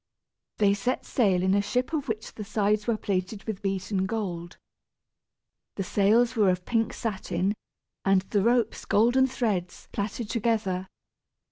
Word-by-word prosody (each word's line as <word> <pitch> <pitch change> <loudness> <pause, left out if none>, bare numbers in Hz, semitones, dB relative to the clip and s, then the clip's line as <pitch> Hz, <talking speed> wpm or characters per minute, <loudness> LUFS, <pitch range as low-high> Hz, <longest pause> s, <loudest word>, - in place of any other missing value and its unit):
They 200 -2 +4
set 225 +6 -1
sail 190 -7 +2
in 190 0 +3
a 200 - +4
ship 250 +8 -1
of 290 -3 -1
which 220 -2 -4
the 215 - -6
sides 210 0 0
were 230 -2 +2
plated 195 0 -2
with 215 -4 -5
beaten 190 0 -1
gold. 180 -6 -4 1.2
The 195 - -2
sails 225 +6 +3
were 210 -4 +4
of 180 0 -1
pink 225 -2 +1
satin, 195 -3 -2 0.5
and 195 -1 +3
the 200 +1 0
ropes 235 +1 +1
golden 245 +5 +4
threads 205 -9 -2
plaited 210 +2 -3
together. 210 -5 0
205 Hz, 145 wpm, -27 LUFS, 190-225 Hz, 1.2 s, They